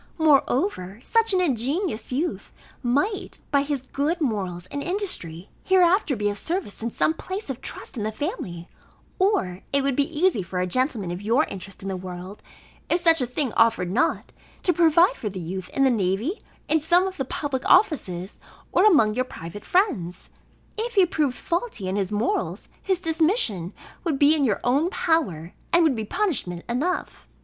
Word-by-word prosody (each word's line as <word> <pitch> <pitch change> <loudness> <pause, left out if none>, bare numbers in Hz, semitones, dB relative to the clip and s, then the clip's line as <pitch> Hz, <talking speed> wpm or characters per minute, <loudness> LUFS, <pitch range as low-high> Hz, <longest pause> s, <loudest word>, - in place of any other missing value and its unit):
Moreover, 275 - +2
such 455 -1 +2
an 375 -1 +3
ingenious 275 - -1
youth 305 +7 -2 0.3
might, 285 - 0
by 280 -1 +4
his 280 -2 -2
good 295 +6 -1
morals 190 - -2
and 285 - -3
industry, 280 - -2
hereafter 370 -4 +3
be 210 -2 -1
of 205 0 -2
service, 340 - -3
in 230 - -1
some 310 - +1
place 375 0 -5
of 255 - -8
trust - - -7
in - - -2
the 215 +1 -1
family; 210 - -5 0.5
or 200 - +1
it 280 0 +2
would 275 -1 +1
be 290 +3 0
easy 360 - +3
for 180 0 -4
a 180 - +1
gentleman 220 - 0
of 175 +2 -5
your 230 +8 +3
interest 195 - -8
in - - -5
the 190 - -2
world, 185 +2 -8 0.5
if 345 - +2
such 330 -3 +4
a 250 - 0
thing 250 0 -2
offered 225 -6 +3
not, 220 - 0 0.3
to 360 - +3
provide 335 +1 +5
for 210 - -3
the 190 -1 -6
youth 180 +2 -5
in 275 - +1
the 265 - +5
navy, 215 - -1 0.3
in 320 - +3
some 350 +4 +3
of 380 -1 -4
the 270 - -1
public 270 -1 -3
offices, 195 - +2 0.3
or 365 - +4
among 260 - +5
your 255 +3 0
private 170 -3 -9
friends. 285 - 0 0.5
If 470 +1 -3
he 385 -2 +6
proved 295 -7 -1
faulty 340 - -3
in 190 - -1
his 195 -2 -1
morals, 225 - -1
his 380 -3 0
dismission 315 - +1 0.3
would 320 -6 0
be 290 +2 +5
in 295 -3 +2
your 215 -5 0
own 280 +8 +2
power, 220 - 0 0.2
and 340 0 +5
would 305 -5 +3
be 220 -1 -3
punishment 215 - -1
enough. 305 +11 -2
270 Hz, 180 wpm, -24 LUFS, -, 0.5 s, he